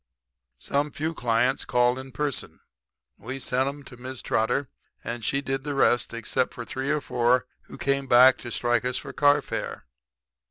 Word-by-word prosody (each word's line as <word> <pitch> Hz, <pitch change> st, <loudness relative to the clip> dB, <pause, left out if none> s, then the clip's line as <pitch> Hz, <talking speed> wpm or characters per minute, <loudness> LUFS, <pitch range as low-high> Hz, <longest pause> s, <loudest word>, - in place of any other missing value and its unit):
"Some 145 Hz, -, 0 dB
few 155 Hz, +3 st, -3 dB
clients 125 Hz, -1 st, +1 dB
called 125 Hz, +1 st, +2 dB
in 135 Hz, 0 st, -9 dB
person. 140 Hz, +1 st, -3 dB, 0.6 s
We 130 Hz, +6 st, -6 dB
sent 130 Hz, 0 st, 0 dB
'em 145 Hz, 0 st, -9 dB
to 125 Hz, -, -12 dB
Mrs. 130 Hz, 0 st, -7 dB
Trotter 125 Hz, +5 st, 0 dB, 0.4 s
and 115 Hz, 0 st, -5 dB
she 140 Hz, +4 st, 0 dB
did 135 Hz, -1 st, -3 dB
the 145 Hz, -1 st, -3 dB
rest; 120 Hz, -3 st, +3 dB
except 115 Hz, +2 st, -1 dB
for 120 Hz, -, -6 dB
three 130 Hz, +5 st, -4 dB
or 150 Hz, 0 st, +1 dB
four 125 Hz, 0 st, +2 dB, 0.2 s
who -, -, -11 dB
came 140 Hz, 0 st, 0 dB
back 125 Hz, +1 st, +7 dB
to 120 Hz, -, -7 dB
strike 120 Hz, 0 st, +1 dB
us 125 Hz, 0 st, -1 dB
for -, -, -7 dB
carfare. 145 Hz, 0 st, +1 dB
130 Hz, 170 wpm, -26 LUFS, 120-140 Hz, 0.6 s, back